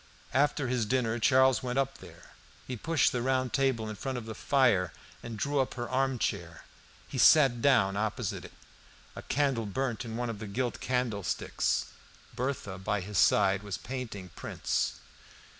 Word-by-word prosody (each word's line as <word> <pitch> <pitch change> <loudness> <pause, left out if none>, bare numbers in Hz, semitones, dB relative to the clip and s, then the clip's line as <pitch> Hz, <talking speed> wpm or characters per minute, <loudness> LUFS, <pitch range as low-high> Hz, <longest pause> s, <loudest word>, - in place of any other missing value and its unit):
After 145 0 +2
his 120 -3 0
dinner 120 -1 0
Charles 130 +1 +4
went 125 0 -3
up 135 0 0
there. - - -14 0.3
He 130 - -4
pushed 160 +5 +2
the 125 - -1
round 130 0 0
table 130 -5 +1
in 110 - -5
front 130 +4 -4
of 120 - -6
the 110 - -6
fire, 115 -8 +2 0.3
and 115 -2 -7
drew 140 +6 0
up 130 - 0
her 120 -1 -4
armchair. 120 -10 -1 0.4
He - - -5
sat 135 -6 +6
down 115 -9 +4
opposite 110 +1 -2
it. - - -11 0.6
A - - -6
candle 135 -6 0
burnt 130 +3 -2
in 115 -1 -5
one 120 -1 -2
of 105 - -8
the 110 - -6
gilt 120 +4 -2
candlesticks. 120 -7 -1 0.5
Berthe 115 -7 -3
by 105 0 0
his 100 +1 -2
side 95 -1 +4
was 100 -4 -5
painting 115 -7 -6
prints. - - -2
120 Hz, 165 wpm, -30 LUFS, 105-130 Hz, 0.6 s, sat